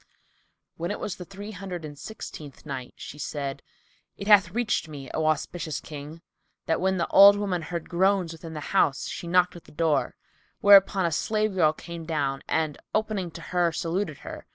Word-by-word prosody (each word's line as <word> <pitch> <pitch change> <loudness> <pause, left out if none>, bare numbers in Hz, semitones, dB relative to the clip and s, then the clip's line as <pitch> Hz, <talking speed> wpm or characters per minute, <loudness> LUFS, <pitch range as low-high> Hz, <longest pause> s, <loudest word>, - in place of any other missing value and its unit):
When 170 +1 -3
it 205 - -3
was 200 - -4
the 180 - -8
Three 200 +3 -8
Hundred 180 -4 -6
and 145 -1 -8
Sixteenth 150 -6 -9
Night, 130 -4 -6
She 150 - -9
said, 140 -2 -4 0.6
It 200 - -6
hath 205 -4 +6
reached 215 -3 0
me, 140 -4 -8
O 160 0 0
auspicious 155 +1 -1
King, 150 +3 -9 0.4
that 160 - 0
when 190 0 +2
the 170 - +1
old 200 +1 +9
woman 195 -4 -1
heard 170 0 -5
groans 185 -1 +2
within 165 -1 -9
the 150 - -5
house, 145 -8 +2
she 175 - -6
knocked 180 +1 +3
at 175 - -12
the - - -16
door, 155 -1 +1 0.4
whereupon 195 -2 +6
a 170 - +1
slave 215 +5 0
girl 160 -5 +4
came 170 +1 -8
down 140 -4 -1
and 155 -2 0 0.2
opening 215 -4 -1
to 165 +1 -10
her, 175 -1 +3
saluted 165 -1 -2
her. - - -8
170 Hz, 185 wpm, -26 LUFS, 155-195 Hz, 0.6 s, old